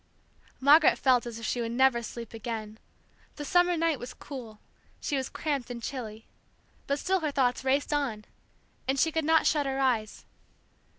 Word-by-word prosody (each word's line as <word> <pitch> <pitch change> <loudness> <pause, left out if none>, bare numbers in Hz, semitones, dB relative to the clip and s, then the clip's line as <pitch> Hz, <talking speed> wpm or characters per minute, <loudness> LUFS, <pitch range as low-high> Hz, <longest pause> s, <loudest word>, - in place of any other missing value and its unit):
Margaret 295 +4 +6
felt 250 -3 +3
as 235 -1 -6
if 230 - -6
she 245 - -1
would 230 0 -3
never 260 -1 +3
sleep 230 0 -8
again. 220 -1 -6 0.6
The 295 - -6
summer 355 +1 +3
night 325 -4 +1
was 245 +1 -8
cool, 235 -7 -9 0.4
she 290 - -2
was 265 -1 -2
cramped 280 -6 -3
and 245 -1 -5
chilly; 225 -5 -6 0.6
but 280 - +1
still 380 +5 +1
her 310 -3 -1
thoughts 260 -3 +1
raced 275 +3 +1
on, 245 -8 -1 0.6
and 270 +1 +1
she 320 - +3
could 320 -1 -1
not 320 0 +4
shut 295 -3 +2
her 270 0 -2
eyes. 235 -6 0
265 Hz, 175 wpm, -28 LUFS, 235-295 Hz, 0.6 s, Margaret